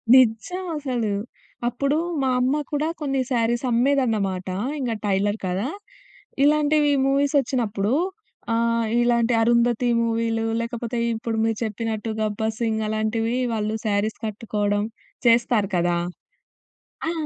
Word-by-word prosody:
నిజం 255 +10 +3
అసలు. 245 -7 -1 0.5
అప్పుడు 275 +5 0 0.2
మా 265 - +1
అమ్మ 265 +4 +2
కూడా 295 +2 0
కొన్ని 270 -2 0
శారీస్ 235 +1 +1
అమ్మేదన్నమాట. 225 -8 +1 0.3
ఇంగా 240 -4 -1
టైలర్ 205 +2 +1
కదా! 190 +7 -1 0.8
ఇలాంటివి 300 0 +3
మూవీస్ 280 +1 +2
వచ్చినప్పుడు 225 -4 -1 0.6
ఆహ్, 230 0 +1 0.2
ఇలాంటి 240 0 +2
'అరుంధతి' 235 +1 +3
మూవీలు 225 0 0 0.2
లేకపోతే 235 0 -3 0.2
ఇప్పుడు 225 0 -3
మీరు 225 -1 0
చెప్పినట్టు 220 0 -3
'గబ్బర్ 215 +1 -1
సింగ్' 220 -2 0
అలాంటివి 225 +2 0 0.2
వాళ్ళు 215 0 -1
శారీస్ 210 +1 0
కట్టుకోవడం 210 -1 -1 0.4
చేస్తారు 230 -3 +3
కదా! 175 0 +1 1.1
ఆ! - - 0
230 Hz, 110 wpm, -23 LUFS, 215-250 Hz, 1.1 s, నిజం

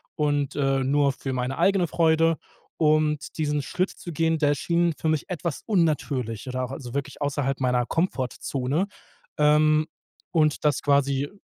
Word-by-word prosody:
und, 145 -3 0
äh, 135 -2 +1
nur 140 +1 +2
für 135 0 -5
meine 125 +1 -2
eigene 195 -3 +3
Freude. 165 0 +3 0.4
Und 155 -1 +1
diesen 150 -2 0
Schritt 185 +7 -1
zu 175 - -9
gehen, 165 +1 +1
der 145 -1 +3
schien 170 +3 +1
für 160 - -1
mich 155 -2 -1
etwas 170 -3 -4
unnatürlich 140 - 0
oder 130 0 -2
auch 125 - -5
also 130 -3 -7
wirklich 140 +1 -4
außerhalb 140 -1 -1
meiner 125 -2 +1
Komfortzone, 140 +1 -1 0.5
ähm, 155 +1 +4 0.4
und 155 -3 +2
das 150 -3 +2
quasi 140 0 +2
145 Hz, 150 wpm, -25 LUFS, 135-160 Hz, 0.5 s, ähm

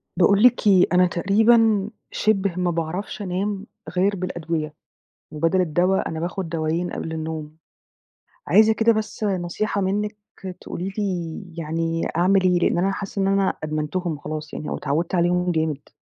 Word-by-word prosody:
باقول 200 +4 +4
لِك 245 -3 +5
إيه 190 -3 +6
أنا 180 0 +5
تقريبًا 215 +3 +3 0.2
شِبه 200 -4 +1
ما 180 -1 0
باعرفش 170 +6 -4
أنام 195 +2 -2 0.3
غير 200 +3 +3
بالأدوية، 165 -4 -3 0.6
وبدل 165 +4 +1
الدوا 180 +3 +1
أنا 160 - -4
باخد 175 +1 -3
دوايين 165 +2 -1
قبل 160 - -5
النوم. 160 -1 -5 0.9
عايزة 220 +1 +5
كده 225 +1 +3
بس 215 0 -3
نصيحة 195 +2 -1
منِك، 210 +2 -1 0.4
تقولي 190 +3 -5
لي 180 -4 -2 0.2
يعني 165 +1 -2
أعمل 185 +3 +4
إيه؟ 180 -1 +3
لإن 175 - +1
أنا 190 +3 +1
حاسة 195 0 -4
إن 195 - +2
أنا 195 -1 +2
أدمنتهم 155 +2 -2
خلاص 155 +1 -6
يعني 155 - -5
أو - - -2
اتعودت 165 +6 -2
عليهم 180 0 +2
جامد. 160 -3 -2
180 Hz, 150 wpm, -23 LUFS, 165-200 Hz, 0.9 s, إيه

